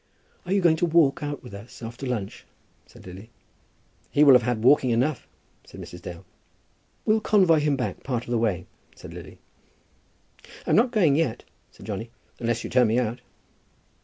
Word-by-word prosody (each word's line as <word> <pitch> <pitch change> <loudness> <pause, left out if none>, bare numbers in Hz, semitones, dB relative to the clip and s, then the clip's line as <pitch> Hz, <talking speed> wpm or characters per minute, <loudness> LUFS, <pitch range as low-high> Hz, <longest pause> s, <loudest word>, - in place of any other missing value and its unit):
"Are - - -4
you 195 0 +2
going 165 -3 +4
to 175 - +1
walk 160 -4 +3
out 145 -1 -5
with 125 - -11
us 110 +4 -11
after 120 +4 -6
lunch?" 110 -6 -5 0.4
said - - -17
Lily. 95 +5 -11 0.8
"He 145 - +3
will 140 -3 +8
have 125 - +6
had 115 -1 -2
walking 130 0 +5
enough," 125 +5 0 0.4
said - - -14
Mrs. 90 - -10
Dale. 90 +1 -9 0.8
"We'll 215 0 +3
convoy 185 -7 +4
him 150 -1 +1
back 130 - -4
part 125 -3 -3
of 120 - -9
the 120 - +1
way," 105 -7 -1 0.3
said - - -11
Lily. - - -11 1.3
"I'm - - +2
not 240 +3 +4
going 185 - +3
yet," 155 -9 -1 0.3
said - - -15
Johnny, 110 +2 -5 0.3
"unless 115 -1 -1
you - - -5
turn 125 -1 +4
me 110 +2 +1
out." 120 0 -1
125 Hz, 180 wpm, -25 LUFS, 115-150 Hz, 1.3 s, will